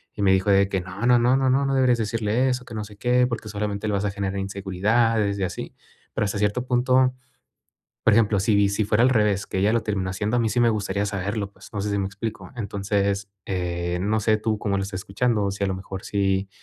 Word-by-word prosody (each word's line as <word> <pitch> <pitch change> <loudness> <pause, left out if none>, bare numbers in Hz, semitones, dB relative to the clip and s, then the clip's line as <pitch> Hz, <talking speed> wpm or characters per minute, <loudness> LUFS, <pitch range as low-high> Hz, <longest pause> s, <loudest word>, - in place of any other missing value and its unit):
y - - -5
me 95 - +5
dijo 95 +2 +1
de 100 0 +4
que: 95 -2 -1
"No, 95 +5 -5
no, 120 0 +5
no, 120 +2 +3
no, 135 -1 +2
no, 140 +2 +2
no 135 0 0
deberías 125 -3 +3
decirle 110 +3 0
eso, 125 0 -2
que 115 - -11
no 105 - -3
sé 105 0 -14
qué, 125 +2 +3
porque 115 -3 -5
solamente 105 0 -3
le 105 - 0
vas 100 +1 0
a - - +1
generar 100 -1 -3
inseguridades 100 +2 0
y - - -1
así". 90 - -5 0.4
Pero 110 - 0
hasta 100 0 -2
cierto 105 +4 0
punto, 130 +1 +3 0.9
por 115 - +5
ejemplo, 105 -2 +3
si 100 0 +3
si 100 +2 0
fuera 105 +3 +3
al 130 - +5
revés, 105 -5 +2
que 95 - -2
ella 105 +3 +3
lo 115 - +1
terminó 95 -3 -2
haciendo, 105 +5 -1
a - - +2
mí 115 -1 +1
sí 120 - 0
me 120 -1 +5
gustaría 100 -2 -1
saberlo, 100 +1 -3
pues, - - -15
no 105 - -2
sé 105 +1 -2
si 100 - 0
me 95 - -1
explico. 105 +3 -6
Entonces, 100 -1 -1 0.2
eh, 90 -1 -2
no 105 +3 +1
sé 110 +1 +2
tú 110 0 -1
cómo 100 -2 -1
lo - - -1
estás 95 -1 -5
escuchando, 105 0 0
si 100 +1 -3
a - - +1
lo 95 - -1
mejor 95 0 -7
si, 95 -1 0
105 Hz, 250 wpm, -24 LUFS, 100-115 Hz, 0.9 s, me